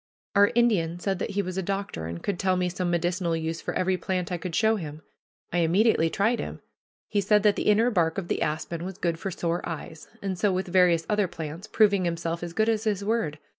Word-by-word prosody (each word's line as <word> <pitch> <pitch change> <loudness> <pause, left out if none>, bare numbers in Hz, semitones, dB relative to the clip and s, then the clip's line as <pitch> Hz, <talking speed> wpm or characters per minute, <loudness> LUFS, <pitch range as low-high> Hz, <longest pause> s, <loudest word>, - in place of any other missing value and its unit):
Our 205 0 +6
Indian 195 -9 +2
said 190 +1 -2
that - - -2
he 200 0 -1
was 185 0 -3
a - - 0
doctor, 195 - -3
and 85 +1 -6
could 195 -4 -2
tell 185 -1 +2
me 180 0 +1
some 180 0 -2
medicinal 175 0 0
use 160 +1 -3
for - - -4
every 185 0 +1
plant 185 -1 -2
I 180 - 0
could 170 -1 -4
show 220 0 +3
him. 155 -4 -7 0.5
I 175 - +2
immediately 170 0 +3
tried 220 +7 +1
him. - - -5 0.5
He 205 -1 +1
said 210 +1 +3
that 210 -2 +4
the - - -2
inner 220 +4 +4
bark 165 -5 +1
of 190 -3 -3
the - - -1
aspen 160 +2 -2
was 190 0 -6
good 170 -2 -1
for 195 - -3
sore 170 -1 -2
eyes; 160 -1 -7
and 190 -2 -3
so 205 +1 +3
with 185 +1 -1
various 175 -2 +4
other 210 -2 +2
plants, 165 +3 -7
proving 200 -4 +3
himself 170 0 -2
as 170 -1 -5
good 220 +4 +2
as 220 0 +1
his 205 -2 0
word. 205 -9 0
180 Hz, 235 wpm, -26 LUFS, 170-200 Hz, 0.5 s, Our